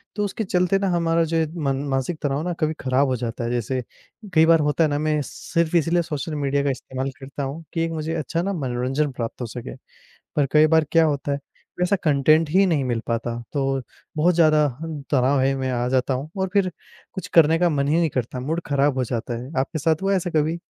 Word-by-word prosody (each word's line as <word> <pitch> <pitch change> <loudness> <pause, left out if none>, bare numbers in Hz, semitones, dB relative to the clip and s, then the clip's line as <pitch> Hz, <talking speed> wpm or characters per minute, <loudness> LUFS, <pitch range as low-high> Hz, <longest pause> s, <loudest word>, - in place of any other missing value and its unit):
तो 210 - -1
उसके 205 +2 -3
चलते 180 -1 +2
ना 195 - 0
हमारा 170 -1 +2
जो 165 0 -1
है 160 - +2 0.2
मन 135 -1 +1
मानसिक 135 +5 -1
तनाव 140 0 -1
ना 175 0 -2
कभी 155 0 +1
खराब 130 +2 +2
हो 130 - 0
जाता 120 0 -4
है, 115 - -2
जैसे 125 +2 -1 0.5
कई 160 0 +6
बार 165 -1 +5
होता 150 +2 +2
है 155 - +2
ना, 145 - -1
मैं 155 0 +1
सिर्फ़ 170 +4 -2
इसीलिए 170 +2 +2
सोशल 155 0 -4
मीडिया 140 -1 0
का 140 - +1
इस्तेमाल 130 +1 -3
करता 140 +1 -6
हूँ 140 +5 -5
कि 165 - -1
एक 165 - -4
मुझे 160 0 -3
अच्छा 165 +2 -2
ना 195 +2 -1
मनोरंजन 135 0 -1
प्राप्त 120 -1 -5
हो 120 - -2
सके। 120 +1 -7 0.6
पर 145 - +3
कई 155 0 +6
बार 160 0 +4
क्या 165 -1 +5
होता 145 -2 -1
है, 140 - -1 0.4
वैसा 180 +3 +2
कंटेंट 155 +2 +4
ही 190 +4 +5
नहीं 155 -7 +1
मिल 120 -2 -1
पाता, 115 0 -2 0.2
तो 135 -2 0 0.3
बहुत 170 +3 +3
ज़्यादा 155 -2 +5 0.2
ह 160 -3 -5
तनाव 135 0 +3
है 135 +1 +2
मैं 130 -1 -2
आ 120 0 -1
जाता 130 +1 +1
हूँ 135 +4 -5
और 190 - 0
फिर 195 -3 +2 0.4
कुछ 185 0 -6
करने 165 0 +6
का 175 0 +3
मन 140 -3 0
ही 155 - +3
नहीं 170 - +2
करता, 125 0 -3
मूड 160 +6 -2
खराब 140 -1 +2
हो 130 - +1
जाता 120 0 -3
है। 130 - -9
आपके 155 +4 -2
साथ 160 +2 +1
हुआ 195 - +1
है - - +3
ऐसा 180 -1 -2
कभी? 155 +2 +1
150 Hz, 235 wpm, -23 LUFS, 135-165 Hz, 0.6 s, कई